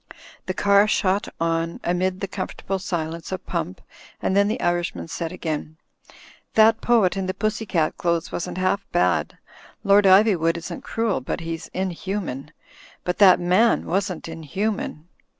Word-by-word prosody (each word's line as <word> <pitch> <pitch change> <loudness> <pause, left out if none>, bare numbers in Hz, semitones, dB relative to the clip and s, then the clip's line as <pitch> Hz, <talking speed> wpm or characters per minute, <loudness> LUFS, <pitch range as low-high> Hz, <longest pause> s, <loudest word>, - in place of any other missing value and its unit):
The 185 - -2
car 200 +1 +4
shot 200 -1 +1
on 165 0 -1
amid 185 +2 0
the 195 - -2
comfortable 190 0 -4
silence 165 -3 -4
of 185 - -5
Pump, 165 - -4 0.4
and 190 - 0
then 200 0 +4
the 215 - -1
Irishman 175 - -1
said 165 -1 -4
again: 155 -3 -4 0.8
"That 220 0 +5
poet 225 -7 +3
in 190 -1 -2
the 185 - -2
pussy 215 0 -2
cat 160 -4 0
clothes 170 -1 -1
wasn't 175 - -4
half 185 +2 +1
bad. 175 - +1 0.5
Lord 200 0 +5
Iv3nvood 190 -4 +5
isn't 170 - -6
cruel; 225 - -1
but 135 - -4
he's 165 0 -5
inhuman. 185 -6 -4 0.5
But 180 - -2
that 190 -3 +7
man 185 +7 +3
wasn't 185 -2 -2
inhuman. 165 +1 -4
185 Hz, 150 wpm, -23 LUFS, 165-200 Hz, 0.8 s, that